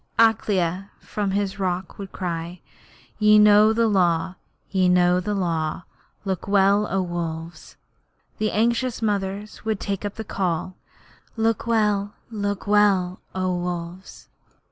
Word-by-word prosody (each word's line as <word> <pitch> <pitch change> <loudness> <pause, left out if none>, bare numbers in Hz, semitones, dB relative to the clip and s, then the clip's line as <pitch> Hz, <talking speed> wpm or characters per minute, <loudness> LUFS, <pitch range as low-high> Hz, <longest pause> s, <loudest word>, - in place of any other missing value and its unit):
Akela 200 -4 +2
from 205 -2 -3
his 200 0 -2
rock 185 0 -3
would 195 -2 -7
cry: 170 -1 -4 0.6
'Ye 210 0 +6
know 210 +1 +6
the 230 +1 +2
Law 180 -4 +1 0.4
ye 185 -2 +3
know 180 0 +4
the 205 +3 -2
Law. 165 -3 -2 0.4
Look 190 -2 -3
well, 200 +1 +3
O 195 -1 0
Wolves!' 170 -1 -6 0.5
and - - -37
the 215 0 0
anxious 235 +2 0
mothers 205 0 -3
would 220 -2 -1
take 200 -1 -3
up 205 -1 -4
the 220 - -5
call: 185 -3 -2 0.6
'Look 225 +1 0
look 205 -1 -1
well, 200 -3 +2 0.2
O 185 -1 0
Wolves!' 175 +1 -6
195 Hz, 130 wpm, -23 LUFS, 180-210 Hz, 0.6 s, Ye